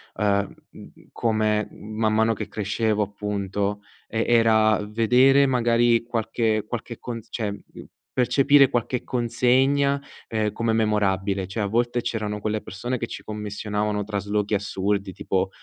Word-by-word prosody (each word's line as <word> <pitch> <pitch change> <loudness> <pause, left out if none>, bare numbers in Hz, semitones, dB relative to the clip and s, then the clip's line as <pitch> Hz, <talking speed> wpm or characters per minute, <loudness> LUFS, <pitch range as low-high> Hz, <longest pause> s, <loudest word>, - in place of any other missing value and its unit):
ehm, 100 -1 0 0.2
m - - -13
mhmm, - - -12 0.2
come 110 -2 0
man 110 0 -2
mano 110 +1 +3
che 105 - -5
crescevo, 105 +1 -1
appunto, 100 0 -2 0.3
e 115 +1 -1
era 110 -3 +4
vedere 125 +6 +4
magari 120 -2 +3
qualche 115 -2 -1
qualche 120 0 -6
con 120 -2 -5
cioè, 110 -4 -3
mhmm, 100 - -11 0.3
percepire 135 +2 +4
qualche 120 +1 -1
consegna, 130 +3 +2 0.3
ehm, 110 -2 -1
come 115 +1 -1
memorabile, 100 -3 +1
cioè, 105 +3 -3
a - - 0
volte 120 +3 0
c'erano 110 -3 -3
quelle 110 0 -2
persone 120 +6 -4
che 115 - -3
ci - - -8
commissionavano 105 0 -3
traslochi 105 0 -2
assurdi, 100 -1 -1
tipo, 95 +1 -1
110 Hz, 140 wpm, -24 LUFS, 105-120 Hz, 0.3 s, era